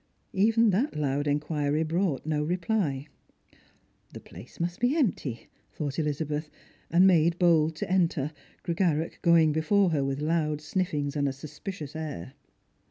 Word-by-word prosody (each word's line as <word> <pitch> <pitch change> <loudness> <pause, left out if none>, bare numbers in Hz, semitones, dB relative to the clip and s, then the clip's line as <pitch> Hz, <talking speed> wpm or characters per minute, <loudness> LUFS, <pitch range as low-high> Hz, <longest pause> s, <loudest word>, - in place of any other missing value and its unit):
Even 225 +3 +4
that 235 +11 0
loud 145 -1 -1
inquiry 150 +1 0
brought 165 -2 -1
no 150 -1 0
reply. 170 -4 -1 0.5
" - - -34
The - - -6
place 120 - -13
must 175 +1 -2
be 250 +6 +2
empty," 155 - -1 0.2
thought 145 -1 -4
Elizabeth, 150 0 -2 0.4
and 175 +3 +5
made 170 -2 +4
bold 160 -3 +3
to - - -4
enter, 165 -6 +1 0.3
Grega 170 -1 +1
rach 160 +2 -5
going 165 -3 +5
before 175 +5 +2
her 145 -3 +1
with 135 0 -2
loud 155 -1 0
sniffings 150 -3 -2
and 145 -1 +1
a - - -2
suspicious 150 +3 -8
air. 150 - -6
155 Hz, 150 wpm, -28 LUFS, 145-175 Hz, 0.5 s, and